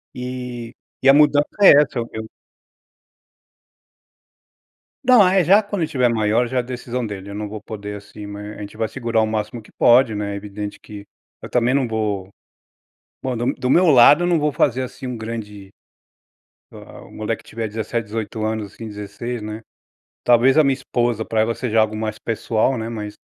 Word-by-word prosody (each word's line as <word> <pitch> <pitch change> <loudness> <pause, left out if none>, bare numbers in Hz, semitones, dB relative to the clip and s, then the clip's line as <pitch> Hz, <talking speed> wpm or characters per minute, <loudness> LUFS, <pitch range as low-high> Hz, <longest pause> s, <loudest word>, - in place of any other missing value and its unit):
E 125 -1 -6 0.3
e 135 - +6
a - - +9
mudança 150 0 +4 0.2
é - - +10
essa, 135 -3 -3
eu 115 - -2
eu 110 0 -6 2.8
Não, 245 -4 +7
ah 185 - +3
é, 190 -2 +4
já 200 +6 +5
quando 205 -2 -4
ele 160 - -1
tiver 125 -5 +2
maior, 110 +1 +1
já 130 - -3
é - - +4
a - - +2
decisão 125 0 -5
dele, 100 -2 -7
eu - - -7
não 105 0 -4
vou 110 0 -6
poder, 105 -1 -7
assim 105 +1 -11
mas 105 +1 -8
a - - -9
gente 100 +1 -9
vai 110 0 0
segurar 115 -3 -1
o - - +2
máximo 110 +1 -3
que - - -20
pode, 120 -1 +4
né, 105 -1 -3
é - - -4
evidente 105 0 -7
que 105 -1 -11 0.3
eu - - -8
também 125 +1 +2
não 135 -3 +1
vou 105 -4 -2 0.9
bom 130 -3 -3
do 120 +2 0
do 125 - -3
meu 180 +7 +5
lado, 145 +4 +7
eu - - +1
não 175 -2 +2
vou 150 0 +1
fazer, 130 -2 +1
assim, 130 +2 -7
um 125 -1 -4
grande 105 -3 -7 1.0
ah - - -12
ah, - - -12
o - - -16
moleque 110 +1 -4
tiver 115 0 -5
17, 110 +2 -3
18 110 0 -4
anos, 110 -2 -3
assim, 115 - -8
16, 105 +3 -6
né. 105 +1 -6 0.6
Talvez 125 +3 +4
a - - +6
minha 135 -1 +3
esposa, 120 -4 -1
pra 110 -1 0
ela 115 +1 0
seja 115 -3 0
algo 110 0 +2
mais 110 -1 -4
pessoal, 115 +2 0
né, 110 0 -4
mas 105 -2 -6
115 Hz, 200 wpm, -21 LUFS, 105-125 Hz, 2.8 s, é